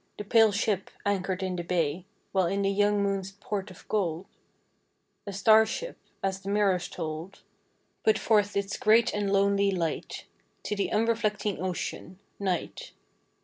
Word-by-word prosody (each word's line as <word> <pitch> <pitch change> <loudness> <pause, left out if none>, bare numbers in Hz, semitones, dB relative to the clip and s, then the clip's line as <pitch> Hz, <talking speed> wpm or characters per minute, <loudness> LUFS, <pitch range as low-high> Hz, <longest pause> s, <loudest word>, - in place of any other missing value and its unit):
The - - -4
pale 220 +1 +5
ship 200 -1 -1 0.2
anchored 190 -2 -1
in 185 -1 -2
the 175 - -3
bay, 170 -1 -1 0.3
While 190 -3 +2
in 200 +3 0
the 195 - +2
young 205 0 +2
moon's 195 -1 -2
port 205 0 -4
of 185 - -15
gold 180 -4 -1 1.0
A - - -3
star 215 +3 +6
ship - - -4 0.2
— - - -42
as 190 0 -1
the 195 0 -7
mirrors 200 -3 +2
told 160 +3 -6 0.3
— - - -44
Put 220 - +4
forth 205 -2 +2
its 200 0 -2
great 220 +2 +4
and 205 -1 -1
lonely 200 0 +3
light 170 -5 -3 0.4
To 210 - -2
the 200 - -1
unreflecting 215 -3 0
Ocean, 185 0 -4 0.2
Night. 200 - -3
200 Hz, 160 wpm, -28 LUFS, 185-210 Hz, 1.0 s, star